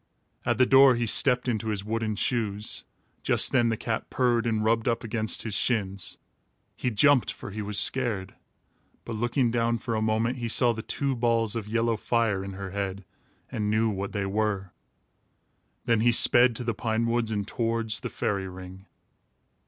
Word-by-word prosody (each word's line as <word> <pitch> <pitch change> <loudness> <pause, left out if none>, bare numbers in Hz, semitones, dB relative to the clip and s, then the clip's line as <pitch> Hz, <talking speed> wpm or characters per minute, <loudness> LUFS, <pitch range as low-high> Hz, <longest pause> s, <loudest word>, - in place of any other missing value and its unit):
At - - +1
the 130 - +5
door 135 0 +6
he 120 0 -1
stepped 125 +3 +3
into 110 -2 -2
his 105 -2 -2
wooden 110 0 -2
shoes. 110 -4 -1 0.4
Just - - +2
then 120 -2 +3
the 115 - -1
cat 110 0 -4
purred 120 -2 +1
and 110 -2 0
rubbed 115 +1 +1
up 115 0 0
against 110 -1 -2
his 110 - -5
shins. 100 -5 -1 0.6
He 125 - -2
jumped, 135 +3 +3
for - - -9
he 105 +2 -5
was 105 0 -1
scared; 115 -5 0 0.7
but 115 - -5
looking 120 +2 0
down, 115 0 0
for 115 0 -4
a 110 - -1
moment, 110 +3 0
he 120 -1 -3
saw 120 +1 +3
the 110 - -6
two 140 +3 -1
balls 115 -2 +1
of 110 -3 -4
yellow 115 +1 0
fire 110 -4 0
in 95 0 -7
her 95 0 -7
head 100 -1 -4 0.5
and 105 -1 -2
knew 110 +1 +2
what 100 0 -4
they 100 -2 -2
were. 100 -2 -2 1.1
Then 115 -2 +2
he 120 +2 +4
sped 120 +1 +5
to 120 - -4
the 115 -1 -1
pine 110 +1 -1
woods 115 -1 0
and 105 -2 -3
towards 115 -2 -2
the - - -5
fairy 100 -2 -2
ring. 95 +1 -11
115 Hz, 185 wpm, -26 LUFS, 105-120 Hz, 1.1 s, door